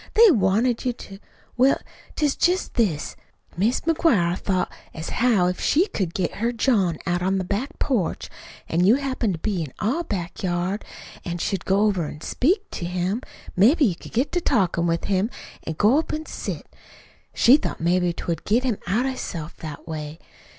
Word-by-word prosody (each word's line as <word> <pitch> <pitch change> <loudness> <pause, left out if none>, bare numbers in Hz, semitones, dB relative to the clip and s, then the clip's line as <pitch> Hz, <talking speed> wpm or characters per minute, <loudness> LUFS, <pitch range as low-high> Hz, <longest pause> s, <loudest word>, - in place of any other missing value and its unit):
They 455 -2 +8
wanted 225 - +2
you 250 - 0
to 195 -4 -11 0.4
Well, 260 +2 +4 0.4
it's 295 -3 +2
jest 360 +2 +1
this. 190 -11 0 0.4
Mis' 215 +8 +1
McGuire 265 - +2
thought 185 -1 -1 0.2
as 160 0 -5
how 235 -7 +3
if 180 0 -1
she 335 +6 +3
could 180 -5 -3
get 180 -3 -1
her 235 +3 0
John 215 - +1
out 175 -1 0
on 190 +2 +1
the 190 - -1
back 205 +9 -3
porch, 225 - -1 0.4
an' 170 +2 +1
you 205 +6 +6
happened 260 -7 -1
to 165 - -5
be 200 -5 -1
in 150 -5 -5
our 260 +11 0
back 185 - -4
yard, 180 +2 -1 0.4
an' 175 -1 -3
should 185 0 -2
go 195 +1 +2
over 195 -7 +2
an' 150 - -9
speak 365 - +1
to 170 - -4
him, 180 +6 -1 0.3
maybe 270 - +5
you'd 180 -7 0
get 250 +6 0
to 355 - 0
talkin' 185 - +1
with 165 0 0
him, 195 +2 +1 0.4
an' 160 - -3
go 230 +8 +4
up 320 - -3
an' 310 +1 -3
sit - - -5
down. - - -26 0.6
She 255 +5 +7
thought - - -4
maybe 175 +1 +2
'twould 170 -1 -4
get 230 +5 +2
him 245 -6 0
out 220 +8 +1
of 270 - 0
hisself 170 -10 -6
that 155 -3 -8
way. 155 -1 -5
195 Hz, 190 wpm, -24 LUFS, 175-250 Hz, 0.6 s, They